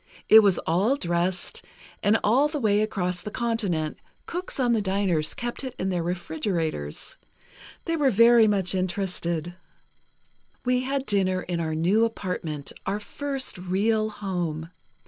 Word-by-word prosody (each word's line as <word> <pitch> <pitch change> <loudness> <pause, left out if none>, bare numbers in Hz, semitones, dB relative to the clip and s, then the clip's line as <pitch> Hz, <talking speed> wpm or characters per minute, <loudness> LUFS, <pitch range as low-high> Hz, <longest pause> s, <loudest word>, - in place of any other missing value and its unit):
It 220 - +10
was 200 -4 +4
all 195 +11 +2
dressed, 175 -4 -1 0.4
and 210 +2 +4
all 260 +8 +4
the 300 0 -3
way 210 -4 +3
across 180 -4 -1
the 210 - -5
continent, 210 -10 -1 0.3
cooks 355 -3 -4
on 245 -2 +3
the 225 - +2
diners 190 -5 0
kept 240 +2 -4
it 260 -1 -5
in 190 +1 -1
their 175 -2 0
refrigerators. 165 - -3 0.7
They 330 - 0
were 290 -4 +3
very 230 0 +6
much 195 -3 +1
interested. 175 -3 -2 1.1
"We 250 0 +2
had 270 0 -1
dinner 190 -4 +1
in 175 -1 -3
our 160 -1 -1
new 185 +8 +3
apartment, 180 -9 -3 0.2
our 200 +2 0
first 270 -1 -3
real 215 +4 +1
home. 175 -6 -4
195 Hz, 145 wpm, -26 LUFS, 175-230 Hz, 1.1 s, It